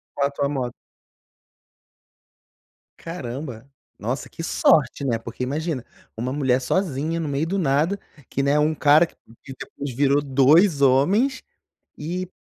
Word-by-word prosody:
Com 140 - +1
a - - +1
tua 140 0 -1
moto? 130 -4 -2 2.3
Caramba, 135 -6 -7 0.3
nossa, 120 +6 -3
que 165 - -8
sorte, 150 -3 +2
né? 120 -4 +1
Porque, 115 +2 -6
imagina, 145 0 -3 0.3
uma 125 +3 -3
mulher 130 -3 +2
sozinha 160 +1 -1
no 160 - -3
meio 140 +2 -1
do 195 +4 -1
nada, 155 +5 +1 0.3
que 135 - -1
né, 140 +2 +2
um 150 +1 +2
cara 150 +2 +5
que 170 - -18 0.3
que 135 - -9
depois 140 -2 -7
virou 140 +2 +3
2 145 +4 +4
homens 190 - +3 0.5
e, 180 +4 -4
145 Hz, 140 wpm, -23 LUFS, 130-165 Hz, 2.3 s, cara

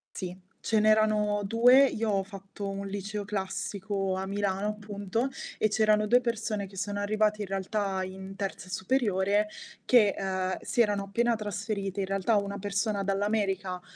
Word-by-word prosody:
Sì, 180 -1 -5 0.2
ce 220 -1 +1
n'erano 215 -1 +3
2, 245 +6 +6
io 225 -3 -1
ho 195 -1 +1
fatto 195 0 -8
un 195 0 -4
liceo 205 +1 -4
classico 195 0 -2
a 190 0 -3
Milano, 200 0 -1
appunto, 210 +3 -2 0.3
e 215 - +2
c'erano 215 0 +3
2 245 +2 +6
persone 220 -4 -2
che 195 0 -14
sono 205 +2 -3
arrivate, 210 +1 +1
in 195 - -5
realtà, 195 0 -1
in 190 +1 -7
terza 195 -2 -5
superiore 205 -1 +1 0.4
che, 215 -5 +5
mhmm, 185 -1 -1
si 240 - -1
erano 205 -3 +2
appena 230 +4 +1
trasferite, 205 -1 -3
in 190 - -1
realtà 195 +3 +1
una 200 0 -1
persona 205 0 -1
dall'America, 195 -2 0
205 Hz, 155 wpm, -29 LUFS, 195-215 Hz, 0.4 s, 2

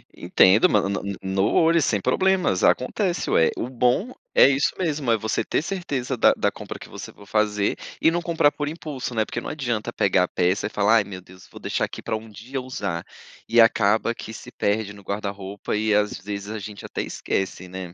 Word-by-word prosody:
Entendo, 95 +4 +5
ma 100 -2 +2
ma 100 - -2 0.2
no 95 0 0
olho, 165 0 +4
sem 105 -6 +1
problemas, 180 - +1
acontece, 180 - +1
ué. 80 - +4
O 125 - -3
bom 130 - +1 0.2
é - - +8
isso 140 +1 +2
mesmo. 150 -8 -1
É 115 - +4
você 110 0 -1
ter - - 0
certeza 145 -8 -3
da 115 - +5
da - - +1
compra - - -8
que - - -10
você - - -9
for 100 - -16
fazer, 105 -1 +1 0.3
e - - +5
não 170 +1 -1
comprar 165 -4 +2
por 145 -1 -4
impulso, 150 -6 -6
né, 110 -2 +1
porque 120 - -5
não - - -6
adianta 120 -8 -2
pegar 95 -2 +2
a - - 0
peça 90 +4 0
e - - -7
falar: 105 +2 +3
"Ai, 105 - +3
meu 95 -2 -9
Deus, 95 0 -16
vou - - -11
deixar - - -2
aqui - - -9
pra 115 - -2
um 110 +1 -7
dia 120 +6 -6
usar". 100 -9 -4 0.4
E 120 - +4
acaba 115 0 +4
que 110 - -8
se 125 - -10
perde 105 -2 -1
no 100 - -13
guarda-roupa 100 0 -4
e, 110 0 +1
às 105 0 +1
vezes, 100 +1 -6
a 110 0 -4
gente 105 0 -8
até - - -4
esquece, 95 -1 -3
né. 90 -1 -7
110 Hz, 215 wpm, -24 LUFS, 100-130 Hz, 0.4 s, é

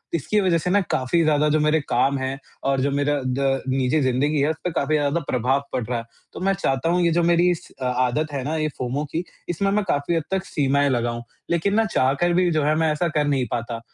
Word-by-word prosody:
इसकी 190 +7 0
वजह 180 -3 +2
से 180 - -2
ना 200 +3 +4
काफ़ी 130 +6 +1
ज़्यादा 150 -1 +3
जो 155 - +2
मेरे 155 +1 +3
काम 135 +3 +2
हैं, 130 +1 -3 0.2
और 135 0 +1
जो 140 - +1
मेरा 145 +1 +1
द 135 +1 0
निजी 130 +3 +1
ज़िंदगी 140 +3 +1
है 145 - +2
उसपे 165 +3 -3
काफ़ी 155 0 0
ज़्यादा 145 +2 +1
प्रभाव 130 +3 +1
पड़ 125 - -1
रहा 120 +1 -2
है। - - -7 0.3
तो - - -7
मैं 195 +1 +1
चाहता 135 -6 -1
हूँ, 180 +1 +2
ये 170 - +3
जो 170 +1 +2
मेरी 175 +1 +4
इस 175 - -5
अ, - - -2
आदत 125 +5 0
है 135 -2 -2
ना 150 +4 -2
ये 155 -1 0
फ़ोमो 130 +4 -2
की 165 - -2 0.3
इसमें 195 +4 0
मैं 210 +1 +1
काफ़ी 145 +2 0
हद 165 - 0
तक 190 0 0
सीमाएँ 140 -2 +1
लगाऊँ। 120 -2 -1 0.3
लेकिन 170 +4 +1
ना 225 0 +3
चाहकर 175 0 +1
भी 180 0 +3
जो 155 -2 +1
है, 150 +1 +2
मैं 160 0 +2
ऐसा 150 +3 0
कर 150 -1 +2
नहीं 135 -3 +1
पाता। 115 0 -3
145 Hz, 245 wpm, -23 LUFS, 135-170 Hz, 0.3 s, ना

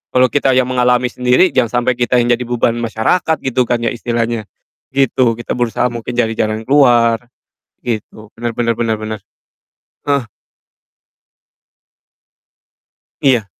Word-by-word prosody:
kalau 130 0 +5
kita 140 -2 +2
yang 130 - +4
mengalami 125 0 +2
sendiri, 125 +10 +3
jangan 120 -1 +1
sampai 125 0 +1
kita 125 +1 +2
yang 120 - +1
jadi 125 - -5
beban 120 -1 +1
masyarakat 120 +9 0
gitu 130 -1 +1
kan 120 - 0
ya - - +1
istilahnya. 120 -2 -2 0.5
Gitu, 130 -3 +2
kita - - -6
berusaha 120 0 0
mungkin 120 0 -5
cari 115 -2 +1
jalan 110 +1 -2
keluar, 120 -5 +4 0.7
gitu. 110 -2 -5
Benar 120 0 -3
benar 115 0 0
benar 115 -1 0
benar. 110 -1 -5 0.9
Eh. 140 -3 +1 3.0
Iya. 125 -6 +3
120 Hz, 130 wpm, -16 LUFS, 115-125 Hz, 3.0 s, kalau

